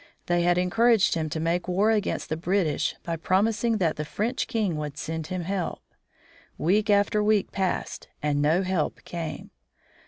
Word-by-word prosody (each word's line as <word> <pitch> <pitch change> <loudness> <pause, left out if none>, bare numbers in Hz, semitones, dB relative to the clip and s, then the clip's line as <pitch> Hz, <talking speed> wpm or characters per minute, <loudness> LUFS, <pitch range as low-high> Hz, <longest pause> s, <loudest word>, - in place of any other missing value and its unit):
They 175 0 +1
had 175 0 +3
encouraged 220 +4 +3
him 160 -2 -1
to 160 - -3
make 170 +3 0
war 195 +5 +2
against 210 -2 -1
the 155 - 0
British 175 -1 0
by 170 -1 -3
promising 215 +6 +1
that 170 -6 0
the 150 - -2
French 215 +11 -2
king 215 -8 0
would 150 -1 -5
send 160 0 -4
him 185 -1 -3
help. 185 0 -3 0.7
Week 205 +6 +1
after 205 +1 +3
week 210 -1 +2
passed 190 -2 -2
and 145 -1 0
no 160 +6 +3
help 185 -5 -1
came. 160 -4 -6
180 Hz, 165 wpm, -26 LUFS, 160-205 Hz, 0.7 s, had